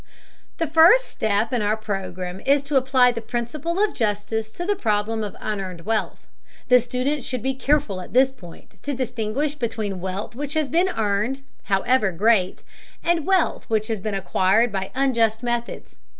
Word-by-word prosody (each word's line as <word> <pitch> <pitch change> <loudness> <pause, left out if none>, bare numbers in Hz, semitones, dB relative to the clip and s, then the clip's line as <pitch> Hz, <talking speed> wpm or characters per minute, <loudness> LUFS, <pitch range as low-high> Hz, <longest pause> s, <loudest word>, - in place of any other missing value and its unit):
The 330 - 0
first 330 - +6
step 220 - -1
in 240 - +1
our 210 +1 +1
program 185 -3 -5
is 280 +5 +2
to 285 +1 -4
apply 260 -1 +4
the 230 -1 -5
principle 245 +9 -3
of 420 0 +2
justice 215 0 -2
to 350 - -5
the 410 +2 +1
problem 220 - 0
of 205 - -6
unearned 190 -5 -4
wealth. 220 +5 -2 0.4
The 250 0 +7
student 250 +4 -2
should 255 -6 -3
be 265 +1 0
careful 265 -8 0
at - - -10
this 260 +2 +4
point 175 -10 -15
to 285 -1 -3
distinguish 250 +3 -2
between 220 -8 -3
wealth 190 +4 -4
which 285 +4 -5
has 310 -3 0
been 350 +7 +2
earned, 220 - -1 0.2
however 205 +2 +2
great, 190 +1 +2 0.4
and 340 -1 +1
wealth 380 -3 +1
which 215 -1 0
has 220 -2 -1
been 205 +1 -3
acquired 195 +4 +2
by 190 -1 -3
unjust 235 -4 +1
methods. 240 -1 -4
230 Hz, 170 wpm, -23 LUFS, 205-275 Hz, 0.4 s, The